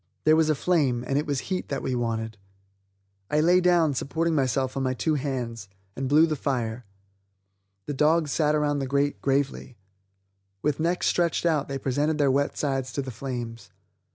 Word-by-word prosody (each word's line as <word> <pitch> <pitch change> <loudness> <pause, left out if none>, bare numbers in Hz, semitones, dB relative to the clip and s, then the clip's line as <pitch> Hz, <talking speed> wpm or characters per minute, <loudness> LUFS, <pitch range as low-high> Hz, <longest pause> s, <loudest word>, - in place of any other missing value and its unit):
There 155 0 +5
was 160 -1 +3
a 155 - +3
flame, 140 -7 +1
and 140 +1 +1
it 150 - -3
was 140 -3 -1
heat 185 -1 -4
that 140 - -3
we 130 - -1
wanted. 115 -2 -2 0.9
I 150 - +2
lay 175 +4 +4
down, 175 -4 +3
supporting 165 +5 -1
myself 130 -2 0
on 135 - -1
my 130 -1 0
two 155 +5 0
hands, 125 -7 -3 0.3
and 135 0 -3
blew 155 +3 +6
the 155 -2 -1
fire; 125 -5 -2 1.0
the 145 - -3
dogs 150 +2 +2
sat 150 0 +2
around 145 -1 +1
the 135 - -2
grate 140 +2 0
gravely; 135 -2 -1 0.9
with 150 -1 0
necks 170 +3 0
stretched 170 -1 +1
out 155 -4 +1
they 140 - -3
presented 145 +4 0
their 140 -3 +3
wet 140 +2 0
sides 135 -3 -1
to 140 - -2
the 130 - -6
flames. 120 -1 -6
140 Hz, 180 wpm, -26 LUFS, 130-155 Hz, 1.0 s, blew